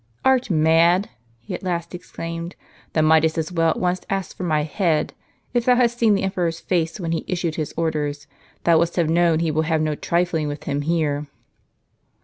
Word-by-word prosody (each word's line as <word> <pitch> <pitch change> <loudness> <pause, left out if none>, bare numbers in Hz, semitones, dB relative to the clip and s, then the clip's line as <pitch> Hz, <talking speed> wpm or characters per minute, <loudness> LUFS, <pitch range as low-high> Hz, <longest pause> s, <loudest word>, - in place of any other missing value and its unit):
"Art 260 -3 +3
mad?" 165 +3 +3 0.3
he 115 - -9
at - - -4
last 175 -2 -3
exclaimed; 170 -1 -6 0.4
"thou 155 - +2
mightest 160 +1 +4
as 160 +1 -2
well 165 -2 +2
at - - 0
once 180 0 0
ask 195 -2 -3
for - - -9
my 155 -4 +1
head. 155 0 0 0.4
If 240 -1 +1
thou 250 - +5
hadst 240 -1 +2
seen 220 -3 +4
the 195 - -1
emperor's 180 -4 -1
face, 170 +1 -1
when 165 -3 -3
he 165 - -1
issued 175 -3 -1
his 155 -2 -3
orders, 150 -3 -2 0.4
thou 165 -2 +5
wouldst 170 +1 0
have 165 -3 +1
known 170 -1 +3
he 165 -2 +1
will 155 +1 +1
have 160 0 0
no 155 -1 0
trifling 170 0 0
with 145 0 -5
him 145 +1 -2
here." 150 -2 -1
165 Hz, 195 wpm, -22 LUFS, 155-180 Hz, 0.4 s, thou